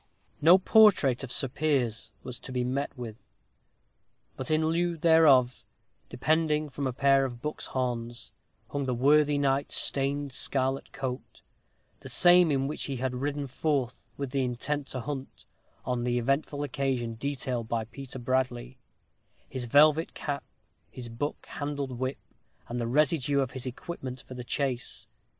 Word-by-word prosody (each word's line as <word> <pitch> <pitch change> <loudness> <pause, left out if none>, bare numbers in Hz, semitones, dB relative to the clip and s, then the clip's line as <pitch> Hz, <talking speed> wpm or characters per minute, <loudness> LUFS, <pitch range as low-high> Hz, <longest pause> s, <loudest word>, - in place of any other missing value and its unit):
No 170 +5 +8
portrait 190 - +5
of 130 - -6
Sir 135 - 0
Piers 125 -6 -1
was 125 -1 -6
to - - -9
be 125 -1 -1
met 135 +3 -2
with. 115 -3 -8 1.1
But 130 - -5
in 155 0 +2
lieu 170 +1 0
thereof, 150 -6 +5 0.5
depending 155 +1 +1
from 140 0 -3
a - - -1
pair 135 +1 +3
of 120 -3 -4
buck's 150 +4 -5
horns, 120 -2 -4 0.4
hung 140 -1 -2
the 125 - 0
worthy 145 +3 +4
knight's 140 0 +1
stained 140 +1 +1
scarlet 135 0 -1
coat 130 -2 -6 0.6
the - - -9
same 175 -1 +6
in 135 -2 +1
which 150 - -4
he 140 - -3
had 130 0 -2
ridden 145 +2 -2
forth, 130 -3 -2
with 140 -2 -4
the 135 0 0
intent 135 +3 -2
to 130 - -5
hunt, 135 +1 -7 0.4
on 125 -1 -1
the 120 0 0
eventful 140 +4 -1
occasion 130 -4 -2
detailed 130 -1 -3
by 115 -2 -1
Peter 130 +3 -9
Bradley, 120 - -2 0.7
his 130 -2 -4
velvet 150 +5 +4
cap, 140 -3 -4 0.5
his 120 -2 -8
buck 120 +6 -4
handled 145 -2 -4
whip, 130 +1 -2 0.5
and 120 +1 -4
the 115 - -1
residue 145 +1 +2
of 135 -1 0
his 130 -1 -5
equipment 130 -1 -6
for 130 - -11
the 125 -1 -7
chase. 130 0 -3
135 Hz, 155 wpm, -28 LUFS, 125-145 Hz, 1.1 s, No